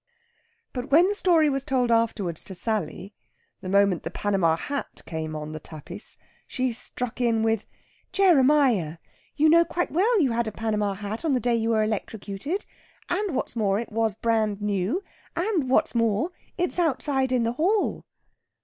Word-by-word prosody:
But 250 +1 -4
when 325 +5 +6
the 400 - +1
story 345 -6 +3
was 275 -2 0
told 255 -4 +1
afterwards 215 -7 0
to 190 - -8
Sally, 205 -1 -3 0.5
the 185 - -6
moment 200 -2 +3
the - - -4
Panama 190 -6 +1
hat 280 +9 -5
came 160 -1 -4
on 155 0 -5
the 155 - -6
tapis, 155 -1 -9 0.3
she 255 -1 -1
struck 245 +1 -4
in 230 -2 +2
with, 225 -1 0 0.4
"Jeremiah! 270 - +4 0.4
you 310 +1 +4
know 335 +2 +6
quite 350 +1 -2
well 420 +8 +3
you 275 -8 +3
had 230 0 0
a - - -2
Panama 210 -2 -1
hat 205 - -5
on 315 -4 +1
the 255 - +2
day 240 +1 +1
you 225 -1 +1
were 220 -1 +3
electrocuted. 215 - -3 0.4
And, 370 -3 -1
what's 260 - -2
more, 205 -3 +1
it 235 - -6
was 220 -2 0
brand 220 -2 0
new! 205 - -1 0.3
And, 340 -7 0
what's 260 - +3
more, 230 - +1 0.3
it's 355 0 0
outside 270 -4 +1
in 250 -2 +2
the 230 +1 0
hall!" 380 - +1
230 Hz, 170 wpm, -25 LUFS, 205-295 Hz, 0.5 s, when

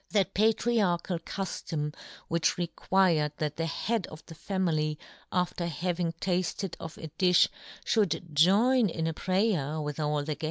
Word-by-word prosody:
That 200 -4 +1
patriarchal 205 -5 +2
cuftom 160 -4 -4 0.3
which 165 0 +1
required 175 -3 +1
that 150 -1 -2
the 165 0 -1
head 220 +4 -1
of 155 - -12
the - - -10
family, 160 -4 -1 0.3
after 180 -1 -1
having 170 +1 -1
tafted 180 +1 -2
of 160 -1 -8
a 160 - -7
difh, 180 -1 +5 0.4
fhould 175 -6 0
join 210 - +5
in 160 -1 -2
a 165 - 0
prayer 185 -5 0
with 150 0 -4
all 150 -1 0
the - - +1
yohn 145 -1 -1
Gutenberg. 150 -1 -3
170 Hz, 155 wpm, -29 LUFS, 155-190 Hz, 0.4 s, difh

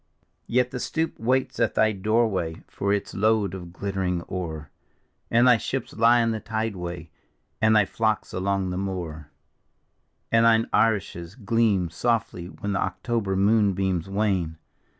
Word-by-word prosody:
Yet 125 +1 +1
the 125 - -4
stoup 160 +6 -2
waits 130 +3 0
at - - +1
thy 110 0 +4
doorway 100 -5 0
for 100 - -2
its 100 -1 -1
load 105 -2 +1
of 90 -2 -8
glitter 95 +1 -4
ing 90 -2 -1
ore, 80 -5 -6 0.6
And 120 +2 +4
thy 125 -2 +7
ships 130 +2 -4
lie 120 +2 +4
in 115 0 +1
the 110 - -2
tideway, 90 -8 -4 0.5
and 110 0 +4
thy 105 -2 +5
flocks 110 +1 -1
along 95 0 -1
the 90 - -3
moore; 85 -6 -5 1.0
And 115 0 +4
thine 115 0 +5
arishes 95 -5 0
gleam 105 -6 +1
softly 110 -4 -1
when 100 +2 -5
the 95 - 0
October 115 -6 -2
moon 100 +1 +3
beams 95 -1 -1
wane. 95 -6 0
100 Hz, 150 wpm, -25 LUFS, 90-115 Hz, 1.0 s, thy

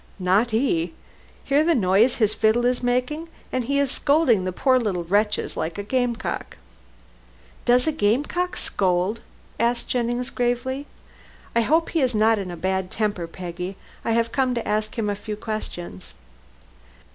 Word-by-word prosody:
"Not 195 +5 +2
he. 180 -8 +1 0.5
Hear 280 +2 +3
the 335 0 +3
noise 210 +3 +4
his 215 -3 +2
fiddle 225 +2 +2
is 245 0 +1
making, 255 +6 0 0.2
and 255 -2 -1
he 280 +3 0
is 280 -2 +1
scolding 280 - +3
the 185 - -1
poor 255 +7 +3
little 195 -7 -1
wretches 210 +4 0
like 160 +3 -3
a 205 - -3
game 245 +2 0
cock." 225 - -5 1.1
"Does 245 +1 +4
a 315 - +2
game 230 -1 +2
cock 360 +4 -2
scold?" 185 +3 0 0.4
asked 235 +1 0
Jennings 245 0 -1
gravely. 255 +3 -1 0.7
"I 235 - +5
hope 320 +8 +2
he 330 - 0
is 255 -3 +1
not 220 0 +4
in 190 -2 -4
a 175 - -6
bad 190 +1 -1
temper, 205 -6 -1
Peggy. 180 +2 -6 0.3
I 230 - 0
have 230 0 +1
come 260 -2 +1
to 235 - -3
ask 215 +3 -1
him 220 -2 0
a 205 - +1
few 210 +1 -5
questions." 175 - -6
225 Hz, 170 wpm, -24 LUFS, 195-255 Hz, 1.1 s, I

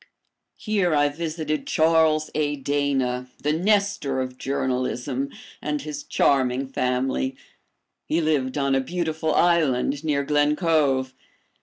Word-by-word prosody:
Here 195 -7 +1
I 145 0 +3
visited 155 0 -3
Charles 160 -1 +3
A. 145 -1 0
Dana, 135 -3 -1 0.2
the 150 +1 +2
Nestor 195 -6 +1
of 130 0 -4
journalism, 130 0 -2 0.3
and 150 -2 -2
his 150 -1 -5
charming 130 -1 +1
family. 130 0 -1 0.7
He 160 - +1
lived 150 -5 0
on 140 -1 +1
a 135 - +3
beautiful 160 0 -2
island 145 -5 +2
near 145 -3 0
Glen 145 +1 +2
Cove. 145 -6 +1
145 Hz, 120 wpm, -24 LUFS, 130-160 Hz, 0.7 s, I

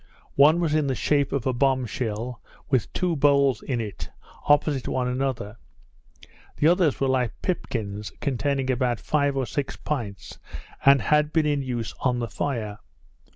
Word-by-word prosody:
One 150 +5 +5
was 165 -3 0
in 155 -2 +2
the 135 - 0
shape 140 +5 +1
of 140 -4 -2
a 130 - +1
bomb 130 0 +2
shell, 115 +1 -4 0.3
with 130 -6 +1
two 180 -2 0
boles 140 -4 +3
in 125 -4 -2
it, 105 -4 -6 0.4
opposite 145 -2 +2
each 125 0 -1
other; 120 -5 -3 1.0
the 150 - +3
others 175 -4 +3
were 135 - +1
like 130 -3 0
pipkins, 105 - -3
containing 135 0 -1
about 125 -2 0
five 145 -2 0
or 135 - 0
six 140 +2 -3
pints, 115 -10 -5 0.4
and 140 -4 +6
had 150 +5 +2
been 160 -1 +2
in 145 -2 +1
use 120 -4 -4
on 125 -2 +1
the 120 -1 -3
fire. 110 -7 -3
135 Hz, 160 wpm, -25 LUFS, 120-145 Hz, 1.0 s, and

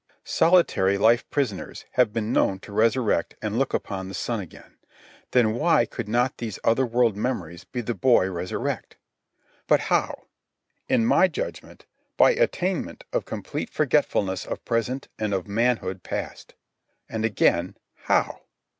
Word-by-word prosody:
Solitary 165 - +3
life 115 +4 +3
prisoners 125 -10 -3
have 125 -4 +3
been 110 0 -2
known 95 - +2
to - - -12
resurrect 115 -3 +1
and 110 +2 -2
look 135 - +1
upon 95 -2 -3
the 95 - -7
sun 115 -2 -2
again. 90 -5 -12 0.5
Then 115 -4 +3
why 165 +9 +3
could 115 -4 -6
not 120 +4 +1
these 110 -5 -4
other 125 +3 +3
world 120 -2 +2
memories 95 -7 -4
of 120 -2 -2
the 120 - -1
boy 115 -2 +3
resurrect? 90 0 -4 0.7
But - - +5
how? - - 0 0.7
In 115 - +3
my 185 - +5
judgment, 175 - -7 0.3
by - - +6
attainment 195 - -1
of - - 0
complete - - -5
forgetfulness 95 -1 +1
of - - -6
present 120 +3 -1
and 105 -2 0
of 95 0 -3
manhood 110 -3 0
past. - - -6 0.5
And 110 -1 -4
again, 90 -5 +1 0.2
how? - - 0
115 Hz, 145 wpm, -25 LUFS, 100-125 Hz, 0.7 s, by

